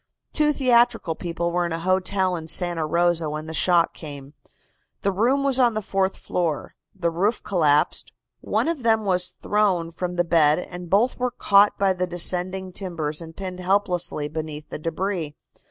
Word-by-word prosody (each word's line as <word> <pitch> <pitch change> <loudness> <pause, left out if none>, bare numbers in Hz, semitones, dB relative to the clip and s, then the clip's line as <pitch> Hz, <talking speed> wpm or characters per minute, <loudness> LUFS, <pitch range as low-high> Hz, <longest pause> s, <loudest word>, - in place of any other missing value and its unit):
Two 300 -1 +3
theatrical 240 - +2
people 170 +1 -3
were 175 +1 0
in - - -7
a 165 - -1
hotel 185 +1 0
in 160 -2 -6
Santa 170 -2 +2
Rosa 170 -1 +2
when 155 +1 -5
the 160 - -7
shock 170 0 +3
came. 145 -2 -9 0.7
The 200 - +2
room 245 +8 +1
was 270 -2 +4
on 240 -3 +3
the 215 - -1
fourth 195 0 -1
floor. 165 -5 -3 0.2
The 170 -3 -1
roof 200 +7 0
collapsed. 150 -6 +1 0.3
One - - -1
of 330 -5 -2
them 220 -2 +2
was 180 -2 +1 0.2
thrown 190 -6 +1
from 180 +1 -4
the 175 - +2
bed 160 -3 +4
and 180 -1 -7
both 225 +9 +2
were 250 0 0
caught 200 -3 +3
by 195 -1 +2
the 180 0 -2
descending 180 +2 -1
timbers 170 -5 -4
and 165 -1 -11
pinned 185 -2 -6
helplessly 180 -5 0
beneath 155 0 -6
the - - -5
debris. 165 -1 -3
180 Hz, 175 wpm, -23 LUFS, 165-200 Hz, 0.7 s, was